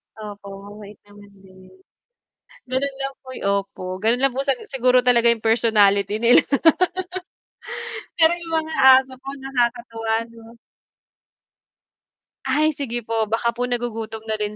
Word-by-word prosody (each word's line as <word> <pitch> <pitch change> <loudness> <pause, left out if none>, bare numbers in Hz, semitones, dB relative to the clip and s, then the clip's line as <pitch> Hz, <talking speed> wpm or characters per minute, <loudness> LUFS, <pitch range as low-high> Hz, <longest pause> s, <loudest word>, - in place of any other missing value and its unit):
Opo, 205 -2 -10 0.2
mabait 205 0 -11
naman 205 0 -17 0.2
din. 185 0 -17 1.0
Gano'n 270 +2 -1
lang 270 0 -4
poy 260 -1 -9
opo, 195 -1 -3
gano'n 230 +3 +2
lang 270 -1 +1
po 270 - -1
sag 275 -2 0
siguro 255 -1 +2
talaga 240 -1 +4
yung 235 - +1
personality 210 -3 +3
nila. 235 +2 +5 1.8
Pero 320 +1 +7
yung 335 -1 -8
mga 315 0 -8 0.3
aso 260 -1 -14
ko 270 +1 -9
nakakatuwa, 235 -3 -2 0.2
'no? 230 0 -15 2.0
Ay 305 +3 +3
sige 240 -4 -4
po, 230 - -2 0.2
baka 235 +1 +1
po 245 - -2
nagugutom 225 -3 -4
na 220 - -1
rin 210 0 -3
235 Hz, 130 wpm, -21 LUFS, 210-260 Hz, 2.0 s, Pero